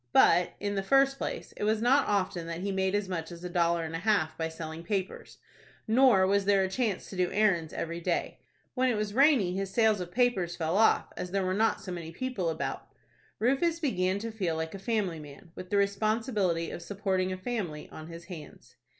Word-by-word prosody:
But, 175 +1 +5
in 205 0 -2
the 195 - 0
first 275 +5 +3
place, - - -4
it - - -4
was 215 +1 +2
not 265 +5 +3
often 185 -4 -1
that 170 +1 -5
he 200 +1 -2
made 190 0 0
as 205 -1 -1
much 170 -2 -4
as 170 0 -10
a 180 - -4
dollar 170 -1 +1
and 160 0 -5
a - - -2
half 180 -6 +1
by 160 0 -2
selling 160 0 -7
papers, 190 +1 -4 0.5
nor 230 -4 +5
was 200 +1 +2
there 200 -1 +4
a 190 - -1
chance 215 -2 -1
to - - -7
do 180 -1 0
errands 185 -7 +2
every 170 +1 -4
day. - - -2 0.3
When 255 0 +2
it 235 - 0
was 210 -1 -2
rainy 255 - +4
his 195 0 -2
sales 220 -1 +2
of 175 - -5
papers 215 -7 +1
fell 165 +1 -1
off, 220 +2 +3
as 180 - -5
there 195 0 0
were 185 - 0
not 220 +2 +1
so 185 - -7
many 170 -2 -6
people 200 -3 -2
about 160 0 -4 0.5
Rufus 275 +8 +1
began 190 - 0
to 225 +2 -5
feel 185 -7 -2
like 160 0 -3
a 195 - -7
family 195 -6 -1
man, 150 +4 -12
with 185 0 -9
the 205 - +1
responsibility 200 -3 0
of - - -6
supporting 190 -1 -1
a 185 - -3
family 185 -7 -4
on 155 - -9
his 170 0 -10
hands. 170 -5 -11
190 Hz, 220 wpm, -29 LUFS, 170-215 Hz, 0.5 s, But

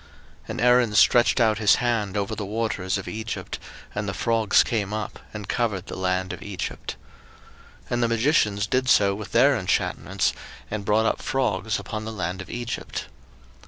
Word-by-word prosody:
02:008:006 - - -21
And - - -3
Aaron 125 -3 +4
stretched 120 +3 +5
out 110 -3 +3
his 105 -2 +5
hand 115 -5 0
over 100 -1 -1
the 105 - -4
waters 100 -2 -1
of 95 - -7
Egypt; 110 +1 -5 0.3
and 105 -1 -2
the 95 - -4
frogs 115 -3 +3
came 105 -3 -2
up, 110 -2 -5
and 105 -2 -7
covered 105 -6 -1
the - - -7
land 95 0 -1
of - - -8
Egypt. 100 -3 -5 0.9
02:008:007 - - -22
And 120 0 +1
the 120 - +3
magicians 115 -4 +2
did 130 +4 0
so 100 -4 +5
with 105 +1 -7
their 130 +4 +5
enchantments, 95 -3 0 0.4
and 105 -2 -3
brought 110 +2 +3
up - - 0
frogs 110 -5 0
upon 110 +2 -5
the 110 - -4
land 95 -2 -3
of 95 - -10
Egypt. 120 -1 -5
105 Hz, 180 wpm, -25 LUFS, 100-115 Hz, 0.9 s, stretched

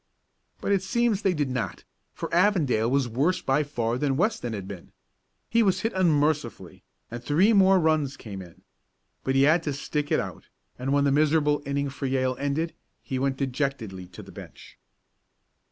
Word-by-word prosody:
But - - -1
it 195 -2 +3
seems 220 +1 +1
they 190 -3 +1
did 145 -4 -1
not, 125 -2 -3 0.3
for - - -6
Avondale 170 - +3
was 135 -1 +1
worse 140 +11 +1
by 135 +3 +1
far 120 -5 -2
than 135 -2 0
Weston 210 - 0
had 100 -3 -5
been. 95 -4 -10 0.5
He 230 - +2
was 195 -4 +2
hit 225 - -1
unmercifully, 155 -5 0 0.3
and 120 0 -6
three 180 - +3
more 195 -2 +5
runs 155 -4 +1
came 100 -4 -8
in. 85 -2 -14 0.6
But 135 - 0
he 135 - +5
had 155 +4 +4
to 150 -3 -2
stick 145 +1 -3
it - - +3
out, - - -6 0.3
and 130 +2 -2
when 140 0 +3
the 140 - +3
miserable 150 0 +2
inning 140 0 -1
for 140 0 -4
Yale 130 -1 0
ended 145 +4 -1 0.3
he 130 - -3
went 135 0 0
dejectedly 130 -9 -3
to 90 - -11
the - - -13
bench. - - -13
140 Hz, 180 wpm, -26 LUFS, 130-165 Hz, 0.6 s, more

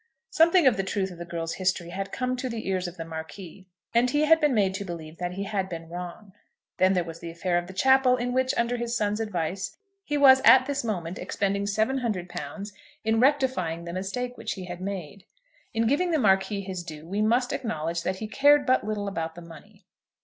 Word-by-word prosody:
Something 335 +1 +5
of 250 -6 +5
the 195 - 0
truth 195 0 -2
of 175 - -11
the 170 - -5
girl's 165 -1 -4
history 185 -2 0
had 195 +2 -5
come 255 0 -1
to 255 0 -3
the 230 -3 -5
ears 185 -1 -1
of 175 - -9
the 165 - -5
Marquis, 165 +4 -9 0.3
and 240 +2 +4
he 295 +4 +1
had 320 +1 +5
been 295 -4 +3
made 195 -3 +2
to 200 +1 -4
believe 165 -3 -8
that 180 0 -3
he 195 +2 -4
had 195 -2 -2
been 165 -1 -7
wrong. 180 +3 -8 0.4
Then 185 +1 +4
there 180 -2 +1
was 165 -1 -9
the 170 - -7
affair 175 +2 -2
of 175 - -8
the 190 - -9
chapel, 265 +5 +4
in 245 0 -2
which, 260 0 +2
under 235 +1 +1
his 235 0 -2
son's 210 0 0
advice, 190 -3 -3 0.3
he 295 -4 -1
was 265 -2 +7
at 260 -1 +8
this 280 -1 -2
moment 180 -6 -3
expending 200 0 -1
£700 205 - -2 0.3
in 220 0 +2
rectifying 250 - +1
the 170 - -6
mistake 245 +7 -3
which - - -3
he 185 -2 -7
had 175 0 -7
made. 190 -1 -6 0.5
In 225 0 0
giving 290 +10 +2
the 325 - +2
Marquis 200 -3 +2
his 185 -2 -5
due 155 -2 -9
we 200 +4 -1
must 240 +3 +2
acknowledge 170 - -2
that 185 - -1
he 215 +3 -5
cared 285 +5 +4
but 255 0 +3
little 210 -1 -3
about 165 -4 -3
the 175 - -9
money. 165 -2 -15
200 Hz, 220 wpm, -26 LUFS, 175-245 Hz, 0.5 s, at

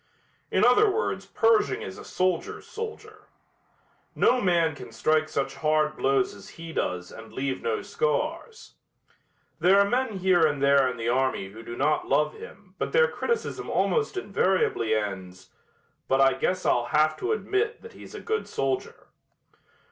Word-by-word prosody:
In - - +3
other 250 - +5
words 440 +3 -2
Pershing 225 - +2
is 95 - -8
a - - -9
soldiers' 185 -2 -2
soldier. 435 -1 -8 0.9
No 250 +1 +3
man 170 -4 +2
can - - -11
strike 155 0 +1
such 135 -3 -2
hard 155 0 +1
blows 135 -3 +1
as 100 -1 -13
he 165 0 -8
does 90 - -3
and 110 0 -11
leave 135 0 -3
no 440 -3 -2
scars. 460 0 -3 0.9
There 185 +4 +5
are 200 - +4
men 240 -2 -1
here 185 -2 +3
and 145 -2 -2
there 140 -1 +4
in 125 - -6
the 115 0 -2
army 130 -6 0
who 110 +3 -11
do 120 +1 -8
not 150 +3 +1
love 150 +2 +2
him 195 -2 -13
but - - -3
their 480 0 +5
criticism 470 -1 -3
almost 435 -4 0
invariably 185 - +1
ends, 95 -3 -5 0.6
"but 135 - +2
I 135 0 +5
guess 185 0 -1
I'll 120 - +2
have 155 +5 +2
to 385 - -2
admit 440 +1 -1
that 460 0 -11
he's - - -12
a - - -6
good 440 0 -2
soldier." 135 -1 -3
155 Hz, 165 wpm, -26 LUFS, -, 0.9 s, other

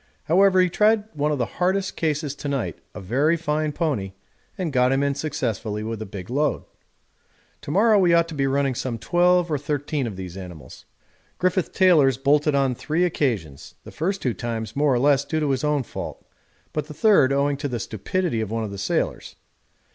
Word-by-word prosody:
However, 185 +3 +4
he 185 - +5
tried 210 +4 +3
one 150 0 0
of 150 - 0
the 120 - 0 0.2
hardest 190 +1 +1
cases 150 -3 -1
to 145 - -7
night, 125 - -2 0.2
a - - -6
very 135 - +1
fine 155 -1 -1
pony, 135 - -2 0.4
and 175 -6 -3
got 125 0 +3
him 135 +1 +2
in 140 0 +1
successfully 120 -8 -3
with 110 0 -4
a 110 - -5
big 95 +2 -8
load. 145 +3 0 1.0
To - - -9
morrow 210 +6 +4
we 180 -3 +4
ought 170 0 +4
to - - -7
be 135 -2 0
running 135 0 +1
some 120 -1 -3
twelve 175 +4 +2
or 150 - 0
thirteen 145 -1 -2
of 105 - -6
these 90 -2 -7
animals. 85 -8 -10 0.5
Griffith 185 0 0
Taylor's 155 - +4
bolted 145 +2 +2
on 135 -2 +2
three 155 +7 -1
occasions, 110 - -2
the - - -11
first 195 +5 -2
two 125 - 0
times 115 -3 -5
more 145 0 +2
or 125 - +3
less 140 +2 +3
due 155 +2 -2
to 150 -2 0
his 130 0 -1
own 150 -2 +1
fault, - - -7 0.5
but 150 -1 -3
the 150 - -9
third 180 -8 +4
owing 140 +1 +1
to 145 +1 -3
the 125 -3 -3
stupidity 115 - -2
of 110 - -3
one 115 +1 -2
of 105 - -5
the 100 - -7
sailors. 95 - -2
145 Hz, 200 wpm, -23 LUFS, 120-160 Hz, 1.0 s, he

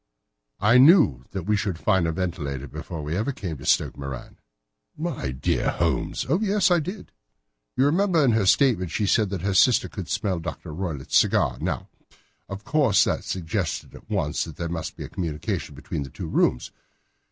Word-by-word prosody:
"I 120 +5 +5
knew 135 - +6
that 95 -2 -5
we 105 +1 +2
should 100 -4 -2
find 90 0 +2
a - - 0
ventilator 75 -6 -3
before 75 +3 -7
ever 105 +10 -1
we - - -2
came 85 -6 -5
to 65 - -9
Stoke - - +2
Moran." 70 -2 -8 0.6
"My 150 - -3
dear 65 0 0
Holmes!" - - -1
"Oh, 160 +8 +2
yes, 200 -3 +2
I 175 - +5
did. 185 +7 -6 0.7
You 130 - +4
remember 170 0 +3
in 125 - +4
her 110 -4 +2
statement 100 -3 +3
she 105 - -1
said 105 +1 +2
that 95 -3 -4
her 100 0 0
sister 120 +6 +4
could 95 -5 -7
smell 100 -3 -1
Dr. 80 - -7
Roylott's 80 -6 -4
cigar. - - +2
Now, - - -2 0.6
of 100 +1 -7
course 140 -6 +3
that - - -1
suggested 90 0 -3
at - - -14
once - - -1
that 80 -3 -9
there 85 +1 -4
must 80 -2 -4
be - - -6
a - - -6
communication 80 -4 -4
between - - -5
the 70 - -6
two - - -7
rooms. 60 - +1
95 Hz, 185 wpm, -24 LUFS, 80-130 Hz, 0.7 s, knew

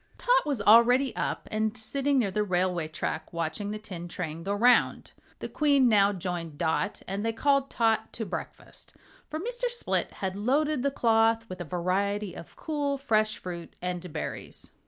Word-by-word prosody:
Tot - - +2
was 270 -8 -1
already 245 +5 +6
up - - -3
and 215 +1 -1
sitting 275 +5 0
near 215 -7 +2
the 210 - 0
railway 180 -4 0
track 155 0 -4
watching 170 +5 -3
the 210 - -3
tin 185 -5 -8
train 165 -2 -5
go 195 +4 -3
round. 235 +4 +3 0.3
The - - -5
Queen 285 -4 +3
now 205 -3 +5
joined 175 -5 -5
Dot 160 +7 -1
and 195 +2 -3
they 225 - +1
called 275 +4 +2
Tot 225 -1 +1
to 225 - -4
breakfast, - - -8 0.3
for 310 - -4
Mr. - - -3
Split 480 0 -2
had 190 -1 -4
loaded 280 +7 +1
the 280 - +2
cloth 225 -3 +2
with 185 0 -6
a - - -4
variety 190 +4 -1
of 165 - -11
cool, 290 -3 -2
fresh 215 -5 +1
fruit 170 -2 -8
and 180 -1 -4
berries. 150 - -6
215 Hz, 175 wpm, -28 LUFS, 180-260 Hz, 0.3 s, already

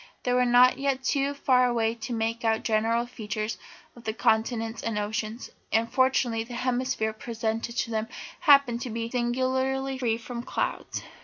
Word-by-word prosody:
They 250 - +1
were 250 0 +3
not 245 +2 +6
yet 270 -1 0
too 280 +1 0
far 255 -3 +3
away 230 -2 +1
to 235 +2 -7
make 230 0 -1
out 225 -1 +3
the - - -8
general 225 +2 +1
features 215 -2 -4 0.4
of 240 - -14
the 220 - -2
continents 225 0 +1
and 225 -2 -2
oceans, 215 +3 -3 0.2
and 225 +1 +1
fortunately 260 -3 +2
the 240 +1 -8
hemisphere 250 -3 -1
presented 230 +1 -3
to 230 - -1
them 220 0 -1 0.3
happened 275 -6 +5
to 255 - -4
be 230 +1 -4
singularly 260 +2 0
free 230 -3 +1
from 235 +1 -6
clouds. 245 - -3
235 Hz, 170 wpm, -27 LUFS, 225-255 Hz, 0.4 s, not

